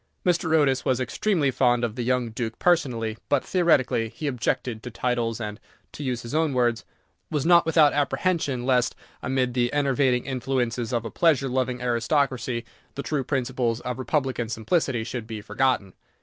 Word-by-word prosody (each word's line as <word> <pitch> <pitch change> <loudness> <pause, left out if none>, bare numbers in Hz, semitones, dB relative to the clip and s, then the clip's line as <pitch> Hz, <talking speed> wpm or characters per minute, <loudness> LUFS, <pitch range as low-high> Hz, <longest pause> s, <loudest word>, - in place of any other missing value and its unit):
Mr. 175 -2 +1
Otis 135 -4 +3
was 130 -1 +1
extremely 150 +2 0
fond 120 -1 +2
of 115 -3 -1
the 125 - -3
young 125 -1 0
Duke 115 0 -4
personally, 120 -11 +1
but, 145 -2 +2
theoretically, 140 -10 +2
he 155 - -8
objected 120 -3 -1
to 125 - -7
titles, 120 -1 -1
and, 105 -1 -5 0.3
to 150 - -7
use 125 -3 -2
his 120 - -7
own 155 -3 +1
words, 120 -3 +1 0.5
"was 150 -3 -1
not 170 -1 +5
without 160 -3 +5
apprehension 145 -3 0
lest, 125 -2 +2 0.3
amid 130 -1 0
the 120 -1 +1
enervating 135 -3 +1
influences 125 -3 -2
of 120 -2 -1
a 115 - -5
pleasure 150 -6 +3
loving 125 -1 -1
aristocracy, 125 0 0 0.3
the 140 - -4
true 150 -3 -1
principles 125 -3 -1
of 125 0 -4
Republican 130 -4 -1
simplicity 120 +1 0
should 115 -1 -5
be 110 -2 -5
forgotten." 105 -2 0
125 Hz, 165 wpm, -25 LUFS, 120-140 Hz, 0.5 s, not